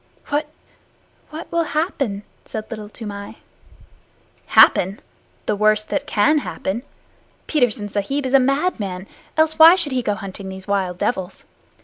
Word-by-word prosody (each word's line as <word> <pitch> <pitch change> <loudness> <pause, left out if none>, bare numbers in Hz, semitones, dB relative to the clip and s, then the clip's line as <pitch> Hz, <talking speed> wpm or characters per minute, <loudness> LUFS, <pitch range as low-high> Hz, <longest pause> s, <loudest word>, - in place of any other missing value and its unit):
"What 295 +1 0 0.8
what 320 +2 -8
will 335 -1 +1
happen?" 275 - -1 0.2
said 215 -1 -7
Little 215 -2 -6
Toomai. 205 -2 -8 1.1
"Happen! 190 +3 +5 0.5
The 210 - 0
worst 215 +1 +2
that 290 0 -2
can 295 +5 +3
happen. 220 -5 -4 0.6
Petersen 245 -8 +1
Sahib 210 +8 -2
is 260 - -2
a 275 - +8
madman. 255 - -1 0.3
Else 315 0 +2
why 325 +2 +10
should 340 -6 -1
he 255 -1 0
go 210 -3 -1
hunting 195 -2 -8
these 190 +1 -9
wild 190 -3 -1
devils? 190 -4 -3
220 Hz, 135 wpm, -21 LUFS, 200-290 Hz, 1.1 s, why